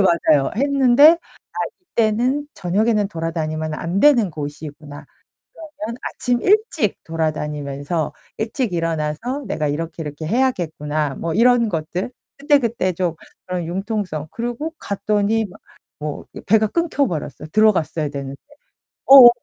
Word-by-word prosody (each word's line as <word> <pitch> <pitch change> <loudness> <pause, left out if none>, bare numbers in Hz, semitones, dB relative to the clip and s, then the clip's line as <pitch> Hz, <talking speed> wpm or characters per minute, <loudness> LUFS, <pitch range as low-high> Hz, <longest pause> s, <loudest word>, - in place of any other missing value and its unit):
맞아요. 155 -6 +3
했는데 280 +2 +6 0.4
아 - - -8 0.4
이때는 250 +7 +1
'저녁에는 205 +3 +1
돌아다니면 160 -3 -3
안 170 +5 -2
되는 240 -11 +5
곳이구나. 145 0 -8 0.5
그러면 270 -8 -7
아침 245 -1 -1
일찍 395 - +2
돌아다니면서 150 -1 -2 0.3
일찍 225 -2 -2
일어나서 165 - -2
내가 155 -5 -1
이렇게 160 +3 -4
이렇게 150 +1 -6
해야겠구나.' 155 - 0
뭐 165 -1 -3
이런 235 0 +4
것들 175 +6 -3 0.3
그때그때 240 -9 +1
좀 175 -1 -1 0.3
그런 180 -2 -3
융통성 185 -4 -3
그리고 240 +8 -4
갔더니 210 +2 0
막 180 - -13 0.4
뭐 150 -1 -5
이 - - -8
배가 220 +1 +3
끊겨 310 +1 0
버렸어요, 150 - -5
들어갔어야 170 -8 +2
되는데. 140 -1 -6 0.7
어 265 -3 +12
185 Hz, 305 characters per minute, -20 LUFS, 155-240 Hz, 0.7 s, 어